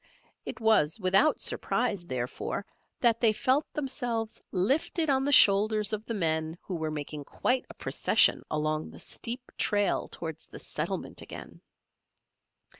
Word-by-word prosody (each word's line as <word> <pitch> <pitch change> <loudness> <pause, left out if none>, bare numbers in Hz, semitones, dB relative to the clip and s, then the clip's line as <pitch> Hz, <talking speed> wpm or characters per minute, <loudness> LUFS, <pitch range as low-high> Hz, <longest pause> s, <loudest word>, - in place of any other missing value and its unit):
It - - -6
was 220 -6 +3
without 195 +11 +3
surprise, 200 -8 -1
therefore, 130 +9 -4 0.4
that 230 -2 +3
they 230 -2 +5
felt 260 +6 +1
themselves 245 -6 -3
lifted 280 - +1
on 265 0 +2
the 285 - +1
shoulders 210 -2 +5
of 215 +1 -3
the 230 - -3
men 160 -3 0
who 190 - -6
were 160 -1 -2
making 150 -1 -5
quite 250 - -1
a - - -11
procession - - +3
along 155 0 -1
the - - -13
steep 245 +2 -3
trail 205 -2 +1
towards 160 -2 -7
the - - -11
settlement - - -4
again. - - -10
215 Hz, 140 wpm, -29 LUFS, 160-245 Hz, 0.4 s, they